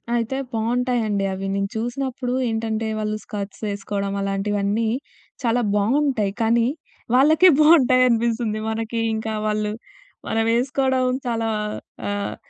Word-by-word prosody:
అయితే 240 +3 -1 0.2
బావుంటాయండి 225 -3 0
అవి. 195 +1 -4
నేను 195 0 -1
చూసినప్పుడు 245 +2 -3 0.2
ఏంటంటే 225 0 -2
వాళ్ళు 215 0 -2
స్కర్ట్స్ 200 -1 -6
వేసుకోవడం 200 0 -3
అలాంటివన్నీ, 200 +2 0 0.5
చాలా 240 0 +2
బావుంటాయి. 225 -1 +1
కానీ 230 +1 +3 0.5
వాళ్ళకే 315 +7 +6
బాగుంటాయనిపిస్తుంది. 245 -7 +4
మనకి 225 +1 -3 0.2
ఇంకా 220 0 -3
వాళ్ళు 210 0 0 0.6
మనం 225 0 +1
వేసుకోడం 260 +1 +1 0.2
చాలా 230 -2 -1 0.6
ఆహ్, 205 0 -2
225 Hz, 105 wpm, -22 LUFS, 210-250 Hz, 0.6 s, వాళ్ళకే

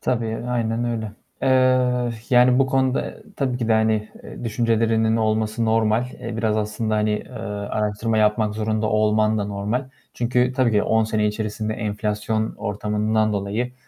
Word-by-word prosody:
Tabii, 115 -2 -1
aynen 115 -1 -1
öyle. 110 -3 -3 0.3
Eee, 130 -2 +3 0.2
yani, 125 0 +5
bu 135 - +4
konuda 130 -1 +1
e, - - -10
tabii 130 -3 -1
ki 115 -2 -2
de, - - +4
hani 110 -1 +2
e, - - -9
düşüncelerinin 115 -1 +1
olması 110 0 0
normal. 110 +1 +2 0.2
Eee, 115 -2 -5
biraz 110 -1 0
aslında, 110 +1 -1
hani, 105 0 +1
eee, 105 +3 -3 0.4
araştırma 110 +1 -1
yapmak 105 0 +2
zorunda 110 0 -1
olman 110 0 +2
da 105 - -1
normal. 105 +6 -2 0.3
Çünkü 125 +1 +1
tabii 130 -4 +3
ki 105 - +3
10 110 0 +2
sene 110 -1 0
içerisinde 110 0 -2
enflasyon 105 0 -2
ortamından 105 +1 0
dolayı, 105 +5 -2
110 Hz, 155 wpm, -22 LUFS, 105-120 Hz, 0.4 s, yani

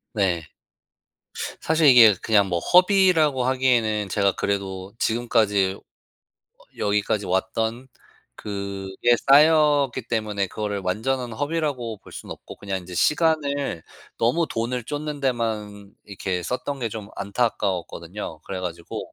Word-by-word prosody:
네. 90 -6 0 1.1
사실 160 -1 +2
이게 120 -5 +8
그냥 105 -3 +3
뭐 90 -2 -1
허비라고 180 - +4
하기에는 120 -5 +1
제가 100 0 +2
그래도 95 -1 -3
지금까지 110 -5 +1
어 - - -16 1.0
여기까지 105 0 0
왔던 110 +7 -1 0.5
그게 100 +3 -1
쌓였기 145 -3 +5
때문에 105 -4 -1
그거를 105 -1 -3
완전한 120 +6 -1
허비라고 145 -5 -2
볼 - - -16
순 - - -9
없고 - - -10
그냥 95 -2 -4
이제 90 0 -10
시간을 145 - +1 0.4
너무 130 +9 +2
돈을 120 +1 -3
쫓는 150 +2 -5
데만 105 -6 -3
이렇게 95 -2 -4
썼던 130 +8 -4
게 115 - -1
좀 105 -2 -7
안타까웠거든요. 100 -5 -3
그래 95 +3 -6
가지고 85 -2 -6
110 Hz, 275 characters per minute, -23 LUFS, 100-130 Hz, 1.1 s, 이게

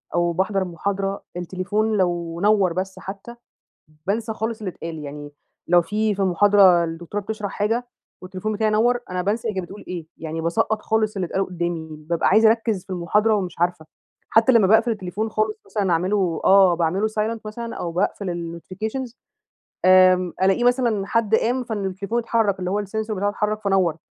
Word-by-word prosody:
أو 175 0 +2
باحضر 190 +2 0
محاضرة، 195 +3 -3
التليفون 205 +5 -1
لو 170 -2 -1
نوَّر 200 -4 +3
بس 190 +1 -4
حتى 200 +5 -8 0.7
بانسى 220 +3 -1
خالص 220 +1 -3
اللي 205 -5 -4
اتقال، 165 -1 -7
يعني 145 0 -8 0.4
لو 175 0 +5
في 210 +4 0
في 195 - -2
المحاضرة 190 -1 +5
الدكتورة 170 +5 -5
بتشرح 210 -1 -4
حاجة، 230 +4 -1 0.3
والتليفون 185 +3 -4
بتاعي 215 +1 +1
نوَّر، 240 +3 +2
أنا 180 0 -2
بانسى 220 +5 -1
هي 215 - 0
كانت 190 -1 -2
بتقول 200 +3 -11
إيه. 175 -3 -5
يعني 160 0 -5
باسقَّط 170 +6 0
خالص 215 -1 0
اللي 185 - -1
اتقال 195 +3 -1
قدّامي، 170 -2 -3 0.2
بابقى 170 - +2
عايزة 220 +3 +6
أركز 225 -5 0
في - - -17
المحاضرة 210 +5 +2
ومش 185 -4 -3
عارفة. 175 -2 0 0.4
حتى 225 +3 +5
لما 220 -5 +5
باقفل 220 +4 +4
التليفون 210 0 -3
خالص 430 - -1
مثلًا 200 - -1
أعمله 180 0 0
آه، 190 -2 +6
باعمله 175 +5 0
Silent 220 +1 -2
مثلًا 230 +2 -6
أو 170 - -4
باقفل 175 -2 -2
الNotifications 220 +8 -5 0.7
آمم، 185 -1 +5
ألاقيه 195 +6 +3
مثلًا 240 -5 +2
حد 225 -1 +1
قام 245 +3 +1
فإن 215 -4 -4
التليفون 200 +5 -3
اتحرك 225 -4 +1
اللي 180 0 -2
هو 205 +1 -1
الsensor 220 +2 -4
بتاعه 205 0 0
اتحرك 210 +1 -2
فنوَّر. 190 -5 +2
195 Hz, 175 wpm, -22 LUFS, 180-220 Hz, 0.7 s, عايزة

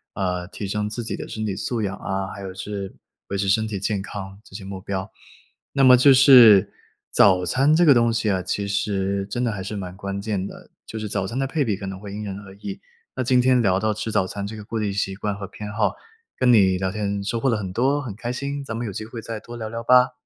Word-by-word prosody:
呃， 90 -2 -2
提 100 +1 -6
升 105 +1 -2
自 115 +2 -4
己 110 - -3
的 - - -7
身 110 0 -4
体 100 -2 -2
素 110 +2 -2
养 95 -1 -2
啊， 95 0 -3
还 100 - -9
有 95 -1 -6
是 100 0 -6 0.3
维 100 - -3
持 95 0 -1
身 110 +3 +2
体 105 -3 -4
健 100 0 -1
康， 95 -1 -8
这 - - -16
些 100 - -7
目 95 -1 -7
标。 95 -1 -4 0.6
那 135 - +2
么 125 -1 +9
就 135 +3 +6
是 125 -7 +8 0.4
早 90 -2 +5
餐 135 - +3
这 175 +1 +4
个 145 - +8
东 115 -1 +3
西 110 -2 0
啊， 95 - 0
其 100 +2 -2
实 100 -1 -1
真 125 0 -2
的 120 - +1
还 100 -2 -5
是 100 +3 -5
蛮 95 -2 -6
关 100 0 -5
键 100 -2 -2
的， - - -13 0.2
就 110 - -6
是 110 -1 -4
早 95 -1 -2
餐 115 +6 -5
的 135 - +1
配 145 +2 0
比 110 -6 0
可 100 - -7
能 95 -1 -6
会 100 -1 -9
因 105 - -5
人 100 -1 -5
而 95 -1 -12
异。 100 -1 -7 0.3
那 130 - -2
今 125 +1 +3
天 125 0 +4
聊 95 -3 +2
到 110 +1 0
吃 110 +1 -4
早 95 - +2
餐 100 +1 -5
这 110 - -7
个 105 - -8
固 115 +1 -3
定 105 -2 -1
习 95 0 -1
惯 105 0 -3
和 100 0 -6
偏 105 +1 -8
好， 105 0 +1 0.5
跟 125 -1 +4
你 95 -5 +5
聊 95 0 -1
天 100 -1 -2
收 115 +3 -2
获 135 - 0
了 115 - +1
很 95 -3 -5
多， 135 +7 +1
很 120 -8 -6
开 120 +3 -4
心， 140 +2 -4
咱 115 -5 -5
们 115 +1 -3
有 105 - -4
机 110 - -5
会 115 0 -8
再 115 -1 -6
多 120 +2 -10
聊 110 -1 -5
聊 115 +1 -5
吧。 125 +2 +5
105 Hz, 290 characters per minute, -23 LUFS, 95-115 Hz, 0.6 s, 么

